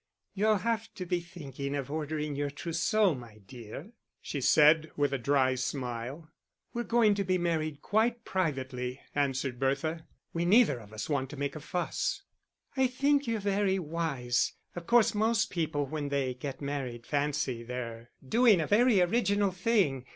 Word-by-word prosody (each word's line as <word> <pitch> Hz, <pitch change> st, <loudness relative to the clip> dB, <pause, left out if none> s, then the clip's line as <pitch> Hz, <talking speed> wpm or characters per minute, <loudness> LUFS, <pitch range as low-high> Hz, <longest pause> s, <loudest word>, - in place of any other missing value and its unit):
"You'll 210 Hz, +1 st, +3 dB
have 225 Hz, +2 st, -2 dB
to 185 Hz, -, -5 dB
be 180 Hz, 0 st, 0 dB
thinking 145 Hz, -5 st, -6 dB
of 140 Hz, -1 st, -4 dB
ordering 150 Hz, -1 st, -3 dB
your 145 Hz, 0 st, -1 dB
trousseau, 170 Hz, +6 st, +1 dB
my 120 Hz, -5 st, -10 dB
dear," 120 Hz, -, -9 dB, 0.3 s
she 140 Hz, -, -5 dB
said, 155 Hz, +4 st, +5 dB
with 145 Hz, -1 st, +1 dB
a 135 Hz, -, 0 dB
dry 130 Hz, +1 st, +2 dB
smile. 130 Hz, +3 st, -4 dB, 0.5 s
"We're 240 Hz, 0 st, -2 dB
going 230 Hz, -3 st, +4 dB
to 200 Hz, 0 st, -1 dB
be 185 Hz, -1 st, +1 dB
married 155 Hz, -4 st, -1 dB
quite 230 Hz, +2 st, +1 dB
privately," 130 Hz, -7 st, -2 dB
answered 135 Hz, -3 st, -1 dB
Bertha. 140 Hz, +5 st, -1 dB, 0.3 s
"We 170 Hz, -, -1 dB
neither 185 Hz, -, +4 dB
of 105 Hz, -2 st, -14 dB
us 110 Hz, 0 st, -5 dB
want 135 Hz, -3 st, -1 dB
to 145 Hz, -, -8 dB
make 140 Hz, +1 st, -2 dB
a -, -, -5 dB
fuss." 175 Hz, +4 st, -2 dB, 0.5 s
"I 265 Hz, -1 st, +3 dB
think 280 Hz, +2 st, +1 dB
you're 225 Hz, -1 st, 0 dB
very 200 Hz, -1 st, +1 dB
wise. 150 Hz, -8 st, -1 dB, 0.2 s
Of 175 Hz, -1 st, -7 dB
course 235 Hz, -1 st, +5 dB
most 220 Hz, +1 st, +1 dB
people, 155 Hz, -4 st, -1 dB
when 145 Hz, +1 st, -4 dB
they 135 Hz, -2 st, 0 dB
get 135 Hz, +2 st, -6 dB
married, 130 Hz, -4 st, -4 dB
fancy 145 Hz, -4 st, -1 dB
they're 120 Hz, -1 st, -6 dB, 0.2 s
doing 225 Hz, -, +5 dB
a 160 Hz, -, 0 dB
very 215 Hz, +2 st, +4 dB
original 200 Hz, +1 st, +2 dB
thing. 180 Hz, -, +1 dB
155 Hz, 165 wpm, -30 LUFS, 135-200 Hz, 0.5 s, said